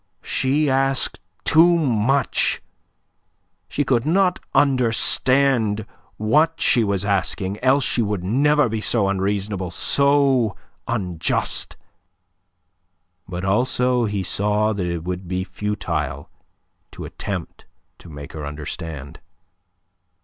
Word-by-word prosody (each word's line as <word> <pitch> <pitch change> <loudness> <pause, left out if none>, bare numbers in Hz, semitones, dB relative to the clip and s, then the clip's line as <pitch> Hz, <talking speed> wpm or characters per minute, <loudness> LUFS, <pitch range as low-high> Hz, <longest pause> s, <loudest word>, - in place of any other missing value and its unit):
She 145 +3 0
asked 135 -1 +1 0.2
too 170 +2 +5
much. 135 -2 +1 1.1
She 145 - -1
could 125 -4 +1
not 180 +4 +2 0.2
understand 125 -3 +2 0.3
what 155 +10 +2
she 120 - +3
was 100 -2 -1
asking, 100 0 -1
else 135 +2 +3
she 120 - +1
would 105 -4 -2
never 145 +8 +3
be 110 -1 -3
so 105 0 +1
unreasonable, 100 -1 -2
so 135 +1 +2 0.3
unjust. 90 -8 -1 1.5
But 90 +1 -4
also 125 +4 +1
he 100 -2 -2
saw 105 +3 0
that 95 -4 -3
it 85 -2 -3
would 90 +1 -5
be 90 +1 -2
futile 85 -8 -4 0.6
to - - -8
attempt - - -6 0.3
to 85 - -14
make 70 -2 -10
her 80 -2 -6
understand. 75 0 -7
105 Hz, 105 wpm, -21 LUFS, 95-135 Hz, 1.5 s, too